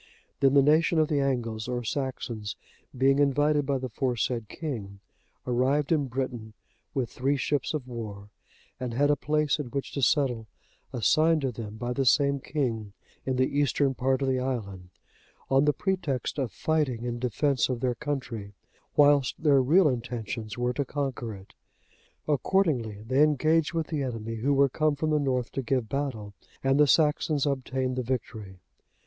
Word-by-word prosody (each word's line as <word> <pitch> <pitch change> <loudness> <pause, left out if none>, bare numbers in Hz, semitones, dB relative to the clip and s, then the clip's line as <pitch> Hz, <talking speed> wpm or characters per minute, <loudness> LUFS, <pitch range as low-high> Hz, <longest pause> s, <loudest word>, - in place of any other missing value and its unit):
Then 135 0 +4
the 140 - +7
nation 160 +3 +3
of 155 -1 +3
the 145 - +1
Angles, 120 -5 -1
or 125 -1 -2
Saxons,(85) 120 -3 -6
being 135 +1 +4
invited 145 +1 +2
by 140 -1 +1
the 130 - -4
aforesaid 120 -2 -2
king,(86) 110 -11 -6 0.5
arrived 130 +5 +1
in 150 -4 +2
Britain 125 -4 -4 0.4
with 130 -4 -1
three 140 +3 0
ships 145 +3 -1
of 135 -4 -4
war 105 -4 -7 0.5
and 125 -2 -4
had 145 +3 +3
a - - +3
place 150 +1 0
in 145 - -3
which 140 +2 -4
to 140 - -3
settle 125 -4 +1 0.4
assigned 155 +7 +3
to 135 -2 -1
them 110 -2 -7
by 120 +2 -3
the 135 +1 0
same 140 +2 +4
king, 120 -8 -3 0.3
in 130 - +1
the 130 +2 0
eastern 145 -1 +2
part 130 +1 0
of - - 0
the 130 -1 +1
island, 100 -8 -4 0.6
on 135 +2 +4
the 150 - +5
pretext 155 -7 -2
of 130 -5 -1
fighting 145 -7 -1
in 120 -1 -3
defence 130 +2 +1
of 125 -2 -2
their 125 0 0
country, 125 -8 -5 0.4
whilst 145 0 +4
their 140 -3 +5
real 160 +7 +5
intentions 115 -3 -4
were 125 0 0
to 140 - -1
conquer 130 -5 -3
it. 95 0 -15 0.7
Accordingly 140 - +1
they 130 +5 +1
engaged 155 +1 +3
with 165 -1 0
the 155 -3 -2
enemy, 115 -3 -4
who 140 +6 +1
were 140 0 +5
come 155 +2 +1
from 155 +2 -1
the 150 - +3
north 130 -4 -1
to 135 - -2
give 125 -2 -1
battle, 125 -8 -3 0.3
and 135 +1 +3
the 150 - +6
Saxons 150 -1 +2
obtained 130 -2 -1
the - - +1
victory. 110 -6 -4
130 Hz, 170 wpm, -27 LUFS, 120-145 Hz, 0.7 s, the